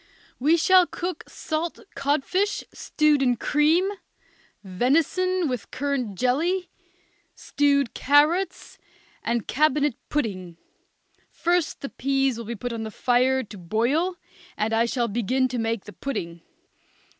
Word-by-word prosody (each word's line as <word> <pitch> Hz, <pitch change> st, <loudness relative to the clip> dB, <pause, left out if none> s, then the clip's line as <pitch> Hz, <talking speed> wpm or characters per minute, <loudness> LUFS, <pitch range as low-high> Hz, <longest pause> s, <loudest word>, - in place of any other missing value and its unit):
We 305 Hz, +6 st, +4 dB
shall 365 Hz, +2 st, +5 dB
cook 355 Hz, +1 st, -5 dB
salt 320 Hz, +1 st, -3 dB, 0.2 s
codfish 305 Hz, +9 st, 0 dB
stewed 300 Hz, -2 st, +1 dB
in 250 Hz, -2 st, +3 dB
cream, 310 Hz, +8 st, +2 dB, 0.8 s
venison 325 Hz, -, +1 dB
with 250 Hz, -5 st, -4 dB
currant 260 Hz, -8 st, -2 dB
jelly, 335 Hz, -, 0 dB, 0.6 s
stewed 280 Hz, -3 st, +1 dB
carrots, 300 Hz, +7 st, +2 dB, 0.4 s
and 235 Hz, -2 st, -1 dB
cabinet 295 Hz, -1 st, +2 dB, 0.2 s
pudding. 185 Hz, -, -3 dB, 0.7 s
First 345 Hz, -2 st, 0 dB
the 275 Hz, -, -5 dB
peas 270 Hz, -2 st, 0 dB
will 230 Hz, -, -6 dB
be 235 Hz, +2 st, -4 dB
put 245 Hz, +3 st, -5 dB
on 230 Hz, -, -4 dB
the 220 Hz, -, -4 dB
fire 255 Hz, +3 st, +2 dB
to 210 Hz, -1 st, -11 dB
boil, 240 Hz, -, 0 dB, 0.4 s
and 220 Hz, +1 st, -1 dB
I 225 Hz, +1 st, +3 dB
shall 235 Hz, 0 st, -1 dB
begin 240 Hz, +4 st, 0 dB
to 245 Hz, -1 st, -3 dB
make 225 Hz, -2 st, -2 dB
the 205 Hz, -, -10 dB
pudding. 170 Hz, -11 st, -5 dB
270 Hz, 125 wpm, -24 LUFS, 235-310 Hz, 0.8 s, shall